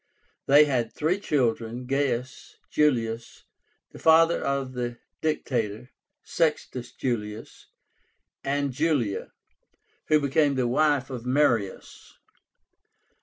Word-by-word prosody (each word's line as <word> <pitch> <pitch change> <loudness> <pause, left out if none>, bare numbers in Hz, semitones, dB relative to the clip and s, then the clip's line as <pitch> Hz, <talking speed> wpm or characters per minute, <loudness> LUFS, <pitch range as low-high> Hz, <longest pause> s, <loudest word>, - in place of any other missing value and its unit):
They 145 +2 +7
had 125 -5 -1
three 165 +6 0
children, 120 - -1
Gaius 130 -1 -2
Julius, 115 -6 0 0.5
the - - -12
father 165 +1 +4
of 135 -2 -2
the 120 -1 -4 0.2
Dictator, 125 -6 -2 0.3
Sextus 140 -6 -1
Julius, 110 -3 -5 0.8
and 140 0 -1
Julia, 140 -8 -1 0.8
who 155 - +4
became 140 0 +2
the 130 -2 +1
wife 140 +1 +1
of 125 -1 -6
Marius. 125 -8 -1
130 Hz, 95 wpm, -26 LUFS, 120-150 Hz, 0.8 s, They